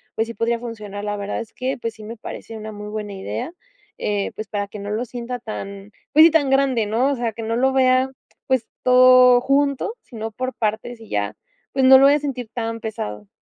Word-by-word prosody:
pues 225 - 0
sí, 230 - -6
podría 235 +1 0
funcionar. 210 -4 -7
La 205 0 -2
verdad 200 0 -3
es 230 - -10
que 260 +1 -3
pues 230 -2 -4
sí, 215 - -12
me 225 +2 -8
parece 225 +1 -8
una 215 0 -7
muy 210 0 -8
buena 210 -1 -5
idea, 190 - -5 0.5
eh, 205 -1 -1
pues, 215 -1 -6
para 205 -1 -3
que 210 +1 -9
no 200 +1 -6
lo 220 +4 -1
sienta 245 +1 -5
tan 200 -3 -7 0.2
pues 310 +2 +9
sí, 335 - +6
tan 290 -4 +3
grande, 265 -5 +2
¿no? 245 +6 +1
O - - 0
sea 235 -3 -2
que 225 - -7
no 225 +1 -1
lo 265 +3 +2
vea, 255 0 +3 0.4
pues 260 -3 +1 0.2
todo 255 0 +7
junto, 280 - +1
sino 225 -1 -7
por 255 +4 -4
partes 220 +2 -2
y 225 - -12
ya, 105 +1 -2 0.4
pues, 265 -1 +2
no 265 0 +10
lo 275 - +6
voy 285 +1 +6
a - - +1
sentir 260 -6 -4
tan 230 -1 -3
pesado. 105 - -6
230 Hz, 230 wpm, -21 LUFS, 210-255 Hz, 0.5 s, no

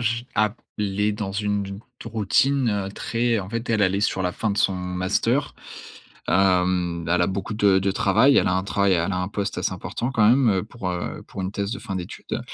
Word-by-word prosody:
je 115 0 0
a 110 0 +3
p 115 - -18 0.2
les 105 +1 0
dans 105 -2 -4
une 105 0 -1
une 100 +1 -7 0.2
routine 115 -1 +1
très 115 0 0
en 95 - -7
fait, 115 +2 -4
elle, 110 -2 +2
elle 95 -1 +3
est - - -1
sur 95 -2 0
la 90 - 0
fin 110 - -2
de 100 - -2
son 95 - +3
master. 90 0 -1 0.7
Hem, 90 -3 +2
elle 90 +1 +3
a - - +3
beaucoup 100 +3 -3
de 100 -2 +4
de 95 0 +1
travail, 110 +8 +4
elle - - +2
a 90 - +1
un 95 - 0
travail, 100 -1 +1
elle 85 +2 0
a - - -1
un 90 +1 -2
poste 100 -2 -3
assez 90 - -1
important 110 +7 -4
quand 105 -3 +4
même, 115 -6 +3
pour, 100 -6 -5
heu, 90 -1 -4
pour 95 - -7
une 95 - -2
thèse 100 +2 -2
de - - -4
fin 95 -4 -5
d'études 90 - -5
100 Hz, 225 wpm, -23 LUFS, 95-110 Hz, 0.7 s, de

